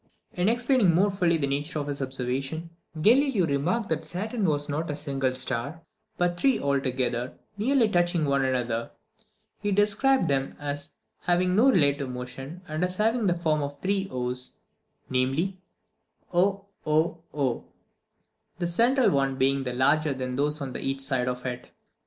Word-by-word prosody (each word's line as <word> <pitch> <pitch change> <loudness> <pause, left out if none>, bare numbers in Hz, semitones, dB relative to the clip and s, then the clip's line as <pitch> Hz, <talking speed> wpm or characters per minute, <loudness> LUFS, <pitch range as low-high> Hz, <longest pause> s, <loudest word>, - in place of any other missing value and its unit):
In 180 +3 +2
explaining 240 -6 +3
more 200 +4 +3
fully 175 -4 +2
the 145 - 0
nature 145 +4 -2
of 145 - -2
his 145 -1 -4
observation, 135 +5 -3 0.3
Galileo 235 - +4
remarked 165 +10 0
that 160 0 0
Saturn 200 +7 -3
was 145 -3 0
not 155 +3 -2
a 145 - -2
single 135 -3 -1
star, 130 +5 -3 0.3
but 175 0 0
three 270 +2 +3
together, 130 -3 -1 0.2
nearly 235 +3 +3
touching 175 -4 +1
one 140 -1 +2
another. 120 -3 -1 0.7
He 205 -1 -1
described 210 +7 +3
them 135 -1 0
as 145 0 -4 0.3
having 180 +1 +1
no 240 +6 +6
relative 140 - +2
motion, 135 +7 -7
and 155 +1 -2
as 180 0 -1
having 225 0 +2
the 175 -1 +2
form 155 -3 +1
of 145 0 -4
three 195 +2 -1
o's, 125 0 -3 0.5
namely, 135 +9 0 0.8
oOo, 195 +2 +2 1.9
the 175 - -1
central 235 +9 +4
one 135 -1 +1
being 135 +1 +2
larger 130 +4 +2
than 130 -1 -3
those 150 +2 0
on 135 -2 -5
each 135 0 -2
side 130 -2 +1
of 125 0 -3
it. 125 -1 -5
150 Hz, 150 wpm, -27 LUFS, 135-190 Hz, 1.9 s, no